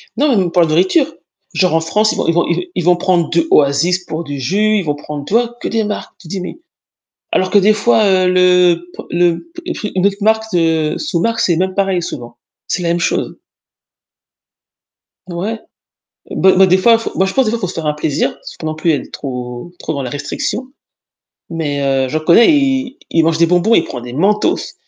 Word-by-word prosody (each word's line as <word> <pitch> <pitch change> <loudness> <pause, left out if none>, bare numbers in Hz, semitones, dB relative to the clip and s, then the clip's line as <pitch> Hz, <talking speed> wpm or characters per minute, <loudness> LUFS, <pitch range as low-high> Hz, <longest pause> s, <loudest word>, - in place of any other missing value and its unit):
Non 290 +5 +2
même 180 -3 +1
pour 175 - +3
de - - +1
la - - -5
nourriture, 190 - +3 0.5
genre 185 -3 +1
en 165 - +2
France 210 +7 +1
ils - - -7
vont - - -1
ils 165 - +3
vont 175 - +2 0.3
ils 180 - -1
vont 180 +1 +4
prendre 175 -2 +1
de 170 -1 +1
Oasis 160 +6 +2
pour 160 +2 -4
du 145 -3 -6
jus, 210 +10 +1
ils 200 - -1
vont 145 -2 -1
prendre, 145 -1 -7
tu 195 - -7
vois, 240 +1 +1
que - - -3
des 225 -1 0
marques. 210 0 -5
Tu 175 - -15
dis 190 +4 -4
mais, 180 - -7 0.7
alors 185 0 +1
que 205 - +5
des 205 +2 +4
fois, 220 +1 +2
heu, 185 -2 +3
le 180 -1 +3
p - - -7
le 170 -1 +1
p 340 - -9
le 210 -11 -4
une 185 - +3
autre 200 0 0
marque 220 +1 +2
de 165 -3 +1
sous-marque 230 - -1
c'est 175 -6 +2
même 185 +2 -1
pareil 195 -2 0
souvent, 120 -7 -7 0.3
c'est 180 - -2
la 170 - -1
même 170 +1 0
chose. - - -1 1.9
Ouais. 195 +6 -4 0.7
Beh 190 - +3
beh, 190 0 +6
des 185 +1 +4
fois, 230 +4 +5
faut 230 - -5
moi 190 - +2
je 190 - -3
pense 265 - +2
des 215 - 0
fois 235 - -1
il - - -14
faut 185 - -1
se 180 - -6
faire 165 - -5
un 150 - +1
plaisir, 150 -1 -1
parce - - -13
que - - -8
non 155 0 -3
plus 160 +2 +1
elle 145 - 0
est - - -15
trop 125 +2 -6
trop 160 - -4
dans 140 - -3
la 125 - -4
restriction. 205 - -4 0.8
Mais, 150 -4 -3
heu, 135 -1 +1
je 155 - 0
reconnais, 170 - +5
il 270 -1 0
il 165 -1 +2
mange 165 0 +1
des 170 - +4
bonbons, 180 +6 +2
il - - +4
prend 125 - -7
des 120 0 -8
Mentos, 195 +10 0
180 Hz, 230 wpm, -16 LUFS, 160-210 Hz, 1.9 s, beh